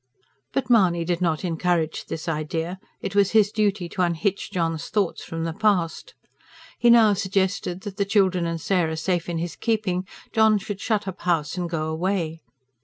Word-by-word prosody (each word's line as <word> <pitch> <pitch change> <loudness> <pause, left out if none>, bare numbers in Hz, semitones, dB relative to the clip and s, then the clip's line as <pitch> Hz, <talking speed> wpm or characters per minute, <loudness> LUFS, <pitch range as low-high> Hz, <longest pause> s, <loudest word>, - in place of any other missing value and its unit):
But 270 - -1
Mahony 185 -8 +3
did 175 0 -1
not 165 0 0
encourage 165 -1 0
this 160 - -6
idea; 165 +3 -2 0.2
it 195 - -4
was 200 0 +3
his 210 -2 +5
duty 205 -4 0
to 185 - -3
unhitch 180 +3 0
John's 165 -3 -2
thoughts 200 -5 0
from 165 0 -5
the 165 0 -2
past. 200 - 0 0.6
He 240 - +4
now 225 -3 +7
suggested 190 -2 -1
that, 205 -1 -7
the 200 - +2
children 190 -4 +2
and 165 0 -3
Sarah 165 -2 0
safe 175 0 -1
in 170 - -2
his 170 +1 -3
keeping, 200 -5 -1 0.3
John 220 -1 +5
should 200 0 -6
shut 210 -3 0
up 190 0 -4
the - - -14
house 165 -3 +1
and 175 -2 -3
go 160 -2 -2
away. 165 0 -2
180 Hz, 180 wpm, -24 LUFS, 165-200 Hz, 0.6 s, now